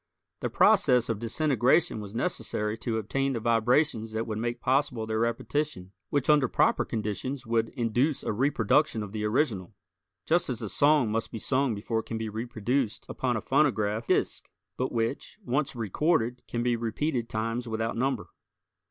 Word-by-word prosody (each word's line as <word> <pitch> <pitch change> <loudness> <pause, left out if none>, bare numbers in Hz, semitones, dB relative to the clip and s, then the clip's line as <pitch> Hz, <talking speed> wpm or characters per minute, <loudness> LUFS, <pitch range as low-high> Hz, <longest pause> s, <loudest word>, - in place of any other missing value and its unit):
The - - -2
process 125 -1 +4
of 110 -3 -1
disintegration 125 +1 +2
was 105 0 -8
necessary 110 -7 -1
to 115 -2 -2
obtain 135 +6 -1
the 115 - -2
vibrations 115 +1 +1
that 110 +1 -1
would 110 -2 -4
make 120 +1 -2
possible 130 -2 +1
their 110 0 -1
repetition, 115 -2 -2 0.2
which 140 -2 0
under 150 -3 +5
proper - - +2
conditions 115 +5 -3
would 115 0 +1
induce 125 +4 0
a - - -1
reproduction 125 0 +2
of 100 - -8
the 105 0 -4
original, 105 - 0 0.5
just 170 -1 +2
as 125 -3 -2
a 105 - -3
song 145 -4 +3
must 115 +1 -2
be - - -5
sung 130 +1 +1
before 110 +2 -2
it - - -7
can 115 - -3
be 110 0 -3
reproduced 115 +2 -2
upon 125 -3 -1
a - - -3
phonograph 115 -6 +1
disc, - - 0 0.3
but 130 - -2
which, 115 - -2
once 135 +1 -1
recorded 120 - 0
can 120 0 -2
be 120 -1 +2
repeated 120 +2 -2
times 115 +2 -2
without 115 0 -2
number. 130 -1 -1
115 Hz, 170 wpm, -28 LUFS, 110-135 Hz, 0.5 s, under